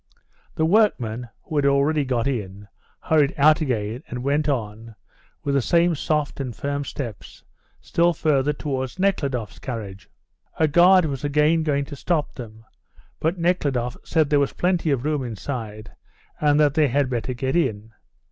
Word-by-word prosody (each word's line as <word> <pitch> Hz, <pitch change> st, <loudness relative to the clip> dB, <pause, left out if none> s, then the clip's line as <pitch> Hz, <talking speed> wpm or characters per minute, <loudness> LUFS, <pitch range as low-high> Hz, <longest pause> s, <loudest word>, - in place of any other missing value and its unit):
The 160 Hz, -, +1 dB
workmen, 125 Hz, -, +1 dB
who 155 Hz, -, -4 dB
had 145 Hz, -, +2 dB
already 140 Hz, +2 st, +2 dB
got 125 Hz, -3 st, -1 dB
in, 105 Hz, -6 st, -4 dB, 0.3 s
hurried 150 Hz, -3 st, +2 dB
out 155 Hz, +2 st, +5 dB
again 115 Hz, -4 st, -2 dB
and 125 Hz, 0 st, -6 dB
went 145 Hz, +2 st, +1 dB
on, 110 Hz, -3 st, -4 dB, 0.5 s
with 140 Hz, -, -1 dB
the 140 Hz, -, +3 dB
same 170 Hz, +6 st, +3 dB
soft 150 Hz, -1 st, -1 dB
and 125 Hz, -5 st, -4 dB
firm 140 Hz, +3 st, -3 dB
steps, 120 Hz, -5 st, -7 dB, 0.4 s
still 170 Hz, +1 st, +2 dB
further 150 Hz, -4 st, +1 dB
towards 135 Hz, -1 st, -4 dB
Nekhludoff's 140 Hz, -, -1 dB
carriage. 100 Hz, -7 st, -7 dB, 0.5 s
A 160 Hz, -, +3 dB
guard 175 Hz, +3 st, +5 dB
was 140 Hz, -3 st, -4 dB
again 150 Hz, +3 st, +2 dB
going 145 Hz, -3 st, 0 dB
to 145 Hz, -, -9 dB
stop 155 Hz, +1 st, -1 dB
them, 110 Hz, -3 st, -10 dB, 0.5 s
but 165 Hz, +4 st, 0 dB
Nekhludoff 140 Hz, -9 st, 0 dB
said 155 Hz, -2 st, +1 dB
there 145 Hz, -, +4 dB
was 140 Hz, -, 0 dB
plenty 175 Hz, -2 st, 0 dB
of 135 Hz, -2 st, 0 dB
room 150 Hz, -3 st, 0 dB
inside, 110 Hz, -2 st, -6 dB, 0.5 s
and 150 Hz, -1 st, +3 dB
that 145 Hz, -2 st, +4 dB
they 155 Hz, -1 st, +3 dB
had 140 Hz, +2 st, +1 dB
better 125 Hz, 0 st, -3 dB
get 130 Hz, +3 st, -2 dB
in. 115 Hz, -10 st, -1 dB
140 Hz, 160 wpm, -23 LUFS, 120-155 Hz, 0.5 s, out